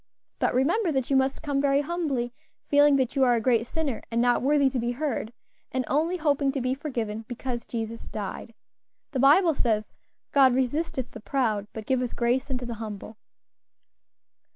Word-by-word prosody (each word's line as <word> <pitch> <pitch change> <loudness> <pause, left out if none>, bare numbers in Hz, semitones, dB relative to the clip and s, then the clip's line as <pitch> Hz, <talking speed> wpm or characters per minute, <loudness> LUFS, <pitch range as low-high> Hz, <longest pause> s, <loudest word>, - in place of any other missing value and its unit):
But - - +1
remember 335 - +2
that 265 -1 -1
you - - +4
must 265 0 +1
come 285 -2 0
very 280 0 +3
humbly; 285 -7 -2 0.3
feeling 290 0 +5
that 260 0 0
you 270 - +3
are 245 -2 +4
a - - +1
great 230 0 +2
sinner, 290 -6 -2
and 230 - -1
not 245 0 +3
worthy 280 +1 +3
to 265 -1 -1
be 240 +1 -1
heard, 260 -5 -2 0.4
and 255 -1 -1
only 325 +6 +1
hoping 285 -4 +1
to 275 - -1
be 255 0 0
forgiven, 230 -6 -4
because 245 0 -5
Jesus 230 -1 -5
died. 215 +2 -6 0.6
The 270 - -2
Bible 315 +6 +5
says, 220 -6 -1 0.4
'God 265 -3 +5
resisteth 265 0 -1
the - - -9
proud, 220 -4 -1
but 220 -1 -7
giveth 250 -1 -1
grace 245 +4 0
unto 250 -2 -3
the 240 - -4
humble.'" 215 0 -7
260 Hz, 175 wpm, -26 LUFS, 235-285 Hz, 0.6 s, feeling